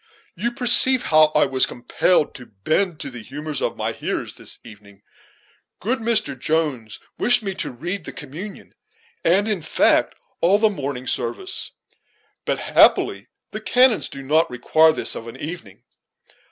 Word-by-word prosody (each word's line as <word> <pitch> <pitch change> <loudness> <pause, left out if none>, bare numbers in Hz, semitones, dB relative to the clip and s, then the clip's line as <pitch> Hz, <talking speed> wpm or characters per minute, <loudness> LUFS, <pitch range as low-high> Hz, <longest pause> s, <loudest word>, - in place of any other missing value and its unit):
You 235 +7 -2
perceive 245 +1 +5
how 155 0 +5
I - - +4
was 130 -1 +2
compelled 145 +6 0
to 125 - -12
bend 155 - -1
to 140 - -6
the 120 -2 -8
humors 145 +5 -5
of - - -2
my - - -2
hearers - - -4
this - - -6
evening. 100 -2 -16 0.8
Good 240 +6 -1
Mr. 220 -11 0
Jones 135 -5 -2 0.2
wished 245 -2 +4
me 195 -2 -3
to - - -3
read 175 +9 -6
the - - -6
communion, 170 +6 -10 0.5
and, 195 +5 +3
in 210 -5 -1
fact, - - +2 0.3
all 185 +4 +4
the 215 0 +2
morning 135 -7 -5
service; 120 -2 -3 0.8
but, - - -1
happily, 100 +3 +3 0.2
the 215 +1 -6
canons 250 +1 +3
do 135 - -9
not 155 +4 +2
require 155 +6 +3
this - - 0
of 115 - -7
an 115 - -9
evening. 150 - -8
155 Hz, 155 wpm, -21 LUFS, 125-200 Hz, 0.8 s, perceive